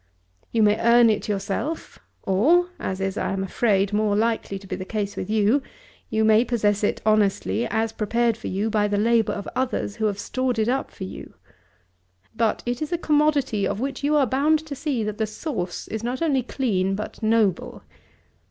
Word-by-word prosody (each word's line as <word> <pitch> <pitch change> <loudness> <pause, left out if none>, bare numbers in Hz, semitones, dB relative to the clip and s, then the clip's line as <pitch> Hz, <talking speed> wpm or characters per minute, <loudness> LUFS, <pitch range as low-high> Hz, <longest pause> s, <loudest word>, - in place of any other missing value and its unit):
You 225 -2 +2
may 210 +1 +3
earn 235 0 +5
it 210 - -2
yourself, 205 +11 -3 0.2
or, 315 - +3
as 190 0 -3
is, 195 +1 -2
I - - -1
am 195 0 -2
afraid, 195 0 +1
more 210 -1 +2
likely 220 -2 0
to 195 - -13
be - - -4
the 185 - -5
case 200 0 -3
with 185 - -5
you, 220 +5 +3 0.5
you 220 0 +1
may 220 +1 +5
possess 210 -4 0
it - - 0
honestly 215 +2 +2
as 225 0 -1
prepared 230 +2 0
for - - -8
you 205 +4 -1
by 210 -1 +2
the 205 0 0
labour 225 +1 +2
of 200 - -6
others 255 -5 -2
who 220 -1 +1
have 200 -2 -2
stored 255 +3 -2
it 220 0 +1
up 265 +2 0
for - - -9
you. 190 - -9 1.0
But 225 -1 0
it 245 +2 -2
is 310 - -3
a 345 - +1
commodity 295 -9 +1
of - - -3
which 270 +2 -4
you 295 +2 +2
are 290 -2 +4
bound 285 +6 +2
to 295 -2 -6
see 265 -5 -2
that 215 0 -4
the 220 - 0
source 215 - -4
is 220 0 -5
not 245 +2 -2
only 280 -5 +2
clean 195 -7 -1
but 210 +3 -6
noble. 215 -4 +1
220 Hz, 200 wpm, -24 LUFS, 205-250 Hz, 1.0 s, earn